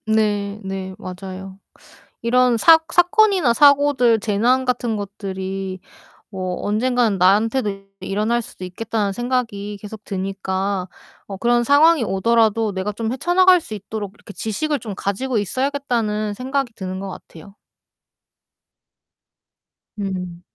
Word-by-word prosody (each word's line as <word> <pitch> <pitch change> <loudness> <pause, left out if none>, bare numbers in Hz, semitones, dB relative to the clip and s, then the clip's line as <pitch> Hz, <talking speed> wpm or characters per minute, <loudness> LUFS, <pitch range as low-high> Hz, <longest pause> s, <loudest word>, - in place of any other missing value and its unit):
네. 210 -2 0
네. 190 -1 -5
맞아요. 190 +1 -8 0.6
이런 245 +1 +3
사 325 +7 +7
사건이나 365 - +4
사고들 280 -4 +5
재난 235 +5 +1
같은 245 -2 -1
것들이 195 -2 -5 0.5
뭐 185 -3 -4
언젠가는 230 0 +1
나한테도 200 +2 +2
일어날 210 +5 0
수도 185 - -9
있겠다는 205 +2 -2
생각이 225 -4 -2
계속 210 0 -10
드니까 190 0 -3 0.4
어 195 - -7
그런 240 +2 +2
상황이 295 +1 +5
오더라도 220 +1 +2
내가 190 +2 -2
좀 220 +2 -3
헤쳐 325 +7 -2
나갈 370 0 +6
수 - - -11
있도록 205 0 -6
이렇게 210 -1 -13
지식을 290 +8 -2
좀 215 -3 -6
가지고 220 +6 -2
있어야겠다는 225 -2 -1
생각이 260 +1 -2
드는 185 -1 -5
거 195 - -5
같아요. 185 +1 -12 2.4
네. 185 -4 -5
215 Hz, 275 characters per minute, -21 LUFS, 195-250 Hz, 2.4 s, 사